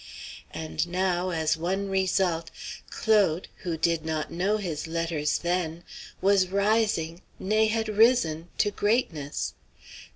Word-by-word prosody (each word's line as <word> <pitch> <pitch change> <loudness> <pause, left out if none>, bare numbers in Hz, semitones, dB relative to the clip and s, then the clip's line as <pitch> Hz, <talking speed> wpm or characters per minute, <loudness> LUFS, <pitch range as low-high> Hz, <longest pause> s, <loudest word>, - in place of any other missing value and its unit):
And 80 - -3
now, 180 0 0
as 160 -2 +1
one 190 +5 -2
result, 185 -3 +1 0.4
Claude, 200 -6 +2
who 170 -3 -3
did 165 0 +1
not 160 -1 -2
know 195 +5 +1
his 170 -7 -4
letters 165 -2 0
then, 175 -1 -2 0.4
was 195 -1 +4
rising 200 -4 +1 0.2
nay, 215 +3 +2
had 225 0 0
risen 215 -7 +3
to 205 - +2
greatness! 200 - -1
180 Hz, 120 wpm, -27 LUFS, 160-200 Hz, 0.4 s, was